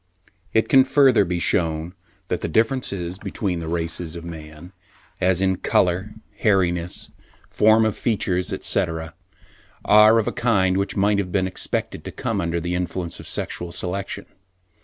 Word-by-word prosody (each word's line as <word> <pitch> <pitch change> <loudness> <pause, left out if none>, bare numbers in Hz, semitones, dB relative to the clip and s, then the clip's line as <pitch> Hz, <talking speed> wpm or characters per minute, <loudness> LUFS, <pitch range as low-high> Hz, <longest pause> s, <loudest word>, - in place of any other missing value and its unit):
It 110 - +2
can 135 -2 +6
further 130 -4 +4
be 90 -1 -2
shewn 80 -1 0 0.4
that - - -1
the - - -2
differences 100 - -1
between 95 -6 -3
the 80 - -6
races 85 0 -3
of 85 0 -8
man, 80 +2 -10 0.5
as 95 0 +2
in 95 -1 +2
colour, 95 +5 0 0.2
hairiness, 90 -4 0 0.4
form 110 +1 +4
of 110 - 0
features, 95 -5 -1
etc., 80 -3 -2 0.7
are 105 +2 +7
of 110 - +1
a - - +1
kind 100 -6 +2
which 100 0 -1
might 100 +1 +2
have 90 -3 -3
been 95 0 +1
expected 95 - -3
to - - -5
come 105 -3 -2
under 85 -1 -1
the 85 +1 -3
influence 90 -1 -3
of - - -10
sexual 85 -1 -4
selection. 95 +3 -4
90 Hz, 155 wpm, -22 LUFS, 85-105 Hz, 0.7 s, are